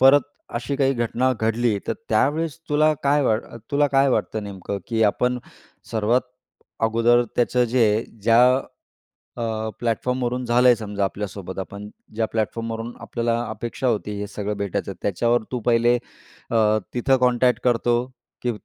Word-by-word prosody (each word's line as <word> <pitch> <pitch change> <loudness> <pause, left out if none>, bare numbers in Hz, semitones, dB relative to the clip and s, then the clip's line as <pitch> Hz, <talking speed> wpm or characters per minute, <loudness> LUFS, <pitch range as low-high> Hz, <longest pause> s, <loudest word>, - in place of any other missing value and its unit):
परत 135 +1 +7 0.3
अशी 120 +4 -2
काही 135 -1 +3
घटना 120 +2 +1
घडली, 110 -1 +1
तर - - +2 0.2
त्यावेळेस 155 +2 +1
तुला 155 +1 +4
काय 145 +1 +3
वाट 110 -2 +2 0.3
तुला 145 +1 +3
काय 135 0 +3
वाटतं 110 -3 -1
नेमकं 100 0 -5
की 115 -1 +1
आपण 125 +4 +1 0.5
सर्वात 115 +3 +2 0.6
अगोदर 115 +2 +4
त्याचं 125 +1 +2
जे 120 -3 +5 0.4
ज्या 115 +2 +5 1.0
अ, - - -4 0.4
प्लॅटफॉर्मवरून 125 +1 -1
झालंय 125 +1 +5
समजा 105 -2 -3
आपल्यासोबत, 95 -1 -5
आपण 100 +2 -7 0.3
ज्या 110 0 +1
प्लॅटफॉर्मवरून 115 +1 -3
आपल्याला 115 -1 -1
अपेक्षा 120 +4 -3
होती, 105 -2 0
हे 105 - -3
सगळं 105 0 -4
भेटायचं. 100 -3 -3
त्याच्यावर 115 +5 +1
तू 125 - -1
पहिले 120 0 +4 0.6
अ, 115 - +2 0.4
तिथं 130 +2 +3
कॉन्टॅक्ट 125 -1 +2
करतो, 120 -1 +2 0.5
की 125 - +1
120 Hz, 140 wpm, -23 LUFS, 110-125 Hz, 1.0 s, परत